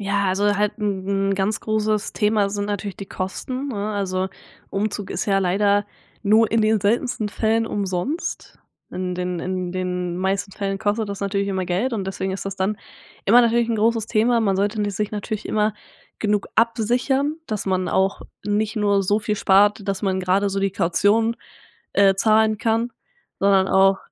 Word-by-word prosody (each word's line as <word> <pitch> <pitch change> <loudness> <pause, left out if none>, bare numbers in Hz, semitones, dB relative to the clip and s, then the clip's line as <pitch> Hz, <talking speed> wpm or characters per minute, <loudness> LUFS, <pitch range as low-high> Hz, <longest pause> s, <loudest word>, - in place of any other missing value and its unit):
ja, 200 0 0
also, 205 +2 +1
halt 210 0 0
'n 195 -1 -1
'n - - +2
ganz 200 +3 -1
großes 215 -1 -1
Thema 210 -2 +2
sind 205 0 -2
natürlich 205 -1 -4
die 195 - -7
Kosten, 255 +9 -4
ne, 215 -3 -3
also, 190 -2 -1 0.4
Umzug 205 0 -2
ist - - -3
ja 195 -1 +3
leider 200 +2 +2 0.4
nur 220 +1 +4
in 225 0 +2
den 215 -1 +3
seltensten 220 +1 0
Fällen 225 +2 0
umsonst. 200 - -3 0.3
In 180 0 -3
den 180 -1 -3
in 185 0 -3
den 180 -1 -2
meisten 195 +2 -1
Fällen 195 -1 -3
kostet 210 +1 -1
das 200 - -6
natürlich 200 0 -1
immer 190 -1 -1
Geld 200 +9 0
und 195 -4 -2
deswegen 190 0 -3
ist 195 - -5
das 195 - -3
dann 195 +2 -1 0.5
immer 235 +5 +7
natürlich 235 0 +2
'n 230 - +1
großes 225 0 +1
Thema. 235 +1 +2
Man 195 -4 +1
sollte 205 +2 0
n 205 - 0
sich 210 +1 -2
natürlich 215 0 -4
immer 215 0 +1 0.5
genug 210 -1 0
absichern, 245 +6 +1
dass 215 -2 -3
man 185 -1 0
auch 190 +1 +1 0.2
nicht 210 +2 0
nur 200 -2 +2
so 205 +3 +2
viel 210 0 -2
spart, 205 +1 +3
dass 195 0 -2
man 190 -1 0
grade 190 +2 +2
so 195 - -2
die 195 0 +1
Kaution, 205 +6 +2 0.6
äh, 195 -1 +5
zahlen 215 +2 +3
kann, 230 +2 0 0.5
sondern 195 -1 +4
auch 195 0 +4
205 Hz, 180 wpm, -22 LUFS, 195-215 Hz, 0.6 s, immer